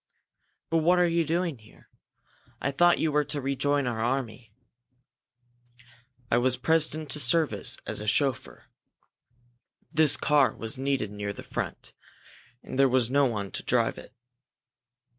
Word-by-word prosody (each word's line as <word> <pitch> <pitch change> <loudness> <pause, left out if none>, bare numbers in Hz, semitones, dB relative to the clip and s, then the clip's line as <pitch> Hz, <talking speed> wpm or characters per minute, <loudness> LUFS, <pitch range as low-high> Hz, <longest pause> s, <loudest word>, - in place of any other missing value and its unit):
"But 165 - +3
what 175 +3 +3
are 180 0 +4
you 170 0 +1
doing 165 -3 -2
here? 110 0 -20 0.7
I 140 - -1
thought 175 +5 +4
you 160 - 0
were 150 0 +2
to 145 - -3
rejoin 140 +1 0
our 120 -2 -3
own 115 - +1
army?" 115 -3 -8 1.8
"I 120 - +4
was 125 0 +2
pressed 160 -1 +1
into 150 -2 -4
service 150 +4 +1
as - - -2
a 105 - -6
chauffeur. 130 +2 -1 1.3
This 155 -2 +4
car 145 -3 +2
was 115 -1 -4
needed 135 -5 -2
near 105 0 -5
the - - -10
front, - - -6 0.7
and 130 - -6
there 135 -1 +5
was 125 -2 +2
no 140 0 +3
one 105 -5 -4
to - - -3
drive - - +1
it. - - -14
135 Hz, 150 wpm, -27 LUFS, 120-155 Hz, 1.8 s, there